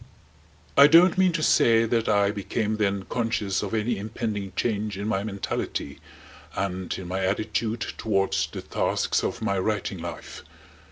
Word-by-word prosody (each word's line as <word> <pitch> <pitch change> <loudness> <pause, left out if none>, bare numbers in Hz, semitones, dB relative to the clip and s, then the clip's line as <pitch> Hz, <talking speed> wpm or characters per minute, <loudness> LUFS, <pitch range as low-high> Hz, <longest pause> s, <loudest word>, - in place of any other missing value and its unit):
I 140 - +9
don't 170 +3 +6
mean 185 -1 +4
to 160 -2 -1
say 115 -4 +4
that 115 0 0
I 100 -1 +3
became 105 +1 -2
then 100 -2 0
conscious 110 -3 -1
of 105 +1 -3
any 110 0 -1
impending 105 -2 -4
change 105 -2 -1
in 100 +1 -4
my 100 -3 0
mentality 100 -8 -4 0.6
and 95 -2 -3
in 95 - -7
my 95 +2 -2
attitude 110 +3 -1 0.2
towards 95 -3 +1
the - - -7
tasks - - 0
of - - -3
my 100 -1 0
writing 105 +2 -2
life. - - -8
105 Hz, 155 wpm, -25 LUFS, 100-115 Hz, 0.6 s, I